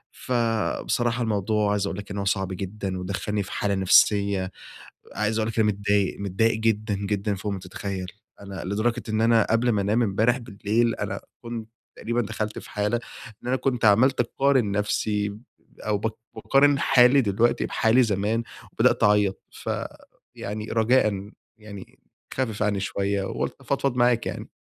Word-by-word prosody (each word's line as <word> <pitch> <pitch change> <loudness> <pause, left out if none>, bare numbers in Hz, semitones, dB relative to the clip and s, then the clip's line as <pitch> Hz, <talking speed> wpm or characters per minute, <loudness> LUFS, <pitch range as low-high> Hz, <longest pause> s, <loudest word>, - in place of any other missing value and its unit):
ف - - -10 0.5
بصراحة 120 0 0
الموضوع 105 -1 0
عايز 100 -1 0
أقول 95 - -4
لك 105 - -9
إن 100 - -4
هو 100 - -2
صعب 95 0 0
جدًا، 95 0 -4
ودخلني 100 +2 -2
في - - -10
حالة 100 -1 -1
نفسية، 95 0 +3 0.6
عايز 110 +2 0
أقول 110 - 0
لك 115 - -3
أنا 110 - +4
متضايق، 100 -1 0
متضايق 105 +3 +1
جدًا، 110 -1 0
جدًا 100 0 -2
فوق 100 +2 -4
ما 95 - -4
تتخيل. 95 +1 -5 0.4
أنا 100 -1 -7
لدرجة 110 +5 -1
إن 110 0 0
أنا 115 -1 +4
قبل 115 +2 +2
ما 105 -4 +2
أنام 110 +5 +2
إمبارح 110 +4 +2
بالليل 115 0 0
أنا - - -4 0.2
كنت 115 -1 -6 0.3
تقريبًا 120 +1 -1
دخلت 105 -1 -4
في - - -13
حالة 105 +3 0 0.4
إن - - -7
أنا 130 - +2
كنت 125 -3 0
عملت 120 +6 +4
أقارن 130 -2 +1
نفسي 105 0 -1 0.4
أو 105 -1 0
ب 110 +2 -2 0.2
باقارن 140 +1 +3
حالي 130 +1 +5
دلوقتي 115 +1 +1
بحالي 115 +3 +3
زمان، 110 +1 0 0.3
وبدأت - - +2
أعيط 105 -2 +3
ف - - -8 0.7
يعني 105 +1 -5
رجاءً 110 -3 +2 0.3
يعني 105 -3 -12 0.3
خفف 115 -5 -1
عني 105 -2 0
شوية 100 0 -1
وقلت - - -3
أفضفض 135 -3 -1
معاك 120 -1 +3
يعني. - - -6
105 Hz, 160 wpm, -25 LUFS, 100-115 Hz, 0.7 s, حالي